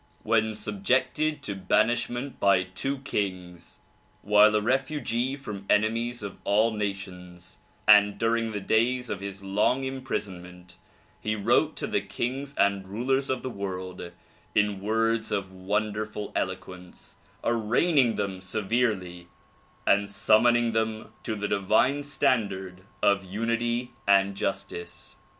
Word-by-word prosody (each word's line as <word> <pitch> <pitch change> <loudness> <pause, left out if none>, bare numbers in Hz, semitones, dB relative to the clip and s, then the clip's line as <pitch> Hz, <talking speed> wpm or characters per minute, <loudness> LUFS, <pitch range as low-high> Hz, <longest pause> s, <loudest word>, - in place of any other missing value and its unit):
When 110 -1 +1
subjected 130 +9 0
to 100 - -1
banishment 120 +6 0
by 100 -2 +4
two 95 +10 -3
kings, 90 -7 -4 0.5
while 105 +1 +6
a - - +4
refugee 130 +1 0
from 100 -8 -8
enemies 115 +2 +1
of 100 -2 -7
all 110 +3 +3
nations 95 -4 -6 0.3
and 105 -1 +7
during 115 0 0
the 105 -1 -4
days 120 +4 +1
of 100 - -3
his 100 0 -7
long 105 +7 +1
imprisonment 95 -9 -6 0.4
he 110 0 -1
wrote 120 +9 +2
to - - -3
the 100 - 0
kings 135 +7 -4
and 100 -1 +2
rulers 130 +7 0
of 130 -1 -1
the 130 - -3
world 95 -3 -6 0.4
in 105 -2 +2
words 115 +2 0
of 95 -2 -2
wonderful 105 +2 -3
eloquence 90 -1 -5 0.3
arraigning 120 +3 +2
them 95 -2 -3
severely 95 -3 -1 0.6
and 100 0 +3
summoning 115 +3 +3
them 110 -1 -2
to 110 - -3
the 105 -1 -2
divine 110 +8 +2
standard 100 -10 -1 0.2
of 100 -1 +3
unity 115 +5 -1 0.2
and 100 0 +4
justice. 95 -3 -4
105 Hz, 125 wpm, -27 LUFS, 95-120 Hz, 0.6 s, and